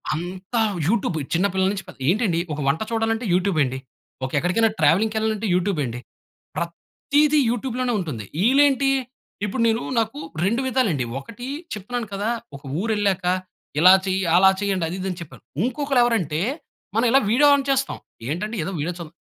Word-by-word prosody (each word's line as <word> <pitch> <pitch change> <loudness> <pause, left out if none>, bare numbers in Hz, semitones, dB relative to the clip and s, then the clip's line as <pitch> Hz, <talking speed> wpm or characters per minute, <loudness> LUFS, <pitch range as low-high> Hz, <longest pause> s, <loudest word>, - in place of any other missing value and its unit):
అంతా 185 +7 -4 0.3
యూట్యూబ్ 195 -5 +1 0.2
చిన్న 175 +4 +2
పిల్లల 190 0 +2
నుంచి 195 -2 -4
పె - - -9 0.2
ఏంటండి 195 -3 +2 0.2
ఒక 150 - -5
వంట 140 +8 +1
చూడాలంటే 225 +1 0
యూట్యూబ్ 185 -1 +1
అండి, 130 -1 -2 0.5
ఒక 130 - -5
ఎక్కడికైనా 180 +9 +2
ట్రావెలింగ్‌కెళ్ళాలంటే 220 +2 +2
యూట్యూబ్ 180 -1 +1
అండి! 120 0 -5 0.6
ప్రతిది 290 - +1
యూట్యూబ్‌లోనే 245 +1 -1
ఉంటుంది! 140 - -5 0.2
ఈళ్ళేంటి 275 +1 +4 0.6
ఇప్పుడు 215 +5 -2
నేను 225 +1 +1 0.2
నాకు 220 -9 -2 0.3
2 230 +6 +1
విధాలండి 220 - +1
ఒకటి 230 - -9 0.3
చెప్తున్నాను 225 +3 -4
కదా, 200 +3 -1 0.3
ఒక 140 - -11 0.2
ఊరెళ్ళాక 205 -3 0 0.5
ఇలా 180 +4 +9
చెయ్యి, 190 0 0
అలా 190 +2 +7
చెయ్యండి 195 -4 0
అది 175 - -4
ఇది 190 - -3
అని 180 - -7
చెప్పారు. 135 -7 -11 0.2
ఇంకొకళ్ళెవరంటే 240 - +1 0.6
మనం 225 +2 +3
ఇలా 270 - +6
వీడియో 290 +6 +5
ఆన్ 280 - 0
చేస్తాం 270 0 0 0.3
ఏంటంటే 210 +9 -3
ఏదో 195 - -3
వీడియో 165 +5 -2
చూద్దాం. 165 -1 -9
205 Hz, 150 wpm, -23 LUFS, 175-235 Hz, 0.6 s, ఇలా